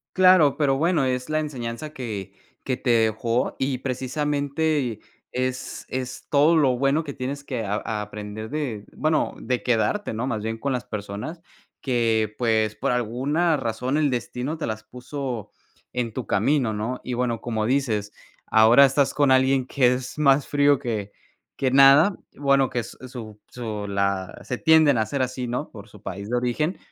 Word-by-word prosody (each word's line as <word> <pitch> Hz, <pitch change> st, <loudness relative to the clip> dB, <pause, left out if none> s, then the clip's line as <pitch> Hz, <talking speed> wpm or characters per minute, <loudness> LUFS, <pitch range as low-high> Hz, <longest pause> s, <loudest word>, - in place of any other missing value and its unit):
Claro, 185 Hz, -6 st, +6 dB
pero 140 Hz, -3 st, +2 dB
bueno, 165 Hz, -1 st, +2 dB
es 125 Hz, +1 st, -2 dB
la 155 Hz, 0 st, +1 dB
enseñanza 140 Hz, -1 st, -5 dB
que, 105 Hz, -, -6 dB, 0.3 s
que 130 Hz, -, -1 dB
te 130 Hz, -, -3 dB
dejó 115 Hz, +1 st, +1 dB
y 130 Hz, -1 st, -1 dB
precisamente 140 Hz, 0 st, -1 dB, 0.3 s
es 130 Hz, 0 st, -3 dB
es 130 Hz, 0 st, -5 dB
todo 150 Hz, +3 st, +4 dB
lo 135 Hz, -6 st, +3 dB
bueno 140 Hz, +5 st, +2 dB
que 145 Hz, -2 st, -6 dB
tienes 140 Hz, +3 st, -5 dB
que 125 Hz, -5 st, -4 dB
a 105 Hz, +1 st, -2 dB
aprender 105 Hz, +1 st, -7 dB
de 130 Hz, -9 st, -3 dB
bueno, 155 Hz, 0 st, 0 dB
de 125 Hz, -3 st, -2 dB
quedarte, 125 Hz, -, 0 dB
¿no? 115 Hz, +3 st, -2 dB
Más 110 Hz, -5 st, -2 dB
bien 110 Hz, +1 st, -3 dB
con 140 Hz, +5 st, -2 dB
las 125 Hz, -1 st, -3 dB
personas 105 Hz, -, -6 dB, 0.4 s
que, 115 Hz, -4 st, +1 dB
pues, 110 Hz, -3 st, +1 dB
por 140 Hz, -, -1 dB
alguna 135 Hz, +8 st, +1 dB
razón 125 Hz, +2 st, -2 dB
el 150 Hz, -2 st, +2 dB
destino 125 Hz, +4 st, -3 dB
te 155 Hz, -, -3 dB
las 110 Hz, -1 st, -4 dB
puso 125 Hz, 0 st, -6 dB, 0.4 s
en 125 Hz, -2 st, -2 dB
tu 130 Hz, -1 st, -4 dB
camino, 115 Hz, +4 st, +1 dB
¿no? 110 Hz, +5 st, -3 dB
Y 125 Hz, -, -4 dB
bueno, 120 Hz, -2 st, -1 dB
como 110 Hz, -3 st, -2 dB
dices, 115 Hz, -6 st, 0 dB, 0.4 s
ahora 115 Hz, +5 st, +7 dB
estás 135 Hz, +1 st, +2 dB
con 145 Hz, -2 st, +3 dB
alguien 130 Hz, 0 st, +3 dB
que 125 Hz, -2 st, +3 dB
es 125 Hz, +2 st, -5 dB
más 140 Hz, -2 st, +3 dB
frío 145 Hz, -1 st, +3 dB
que 105 Hz, -4 st, -3 dB, 0.5 s
que 135 Hz, -, +1 dB
nada. 140 Hz, +8 st, +7 dB, 0.2 s
Bueno, 140 Hz, -1 st, +2 dB
que 120 Hz, -, -1 dB
es 115 Hz, -, -7 dB
su 110 Hz, -4 st, -9 dB
su 110 Hz, -4 st, -5 dB
la 100 Hz, -2 st, -1 dB
se 125 Hz, -, -4 dB
tienden 155 Hz, -3 st, +5 dB
a 110 Hz, -, +2 dB
ser 140 Hz, +2 st, -2 dB
así, 130 Hz, 0 st, -2 dB
¿no? 125 Hz, +5 st, -3 dB
Por 100 Hz, -2 st, -12 dB
su 105 Hz, -, -16 dB
país 100 Hz, +2 st, -6 dB
de 125 Hz, -, +1 dB
origen. 125 Hz, +8 st, -1 dB
125 Hz, 175 wpm, -24 LUFS, 110-140 Hz, 0.5 s, ahora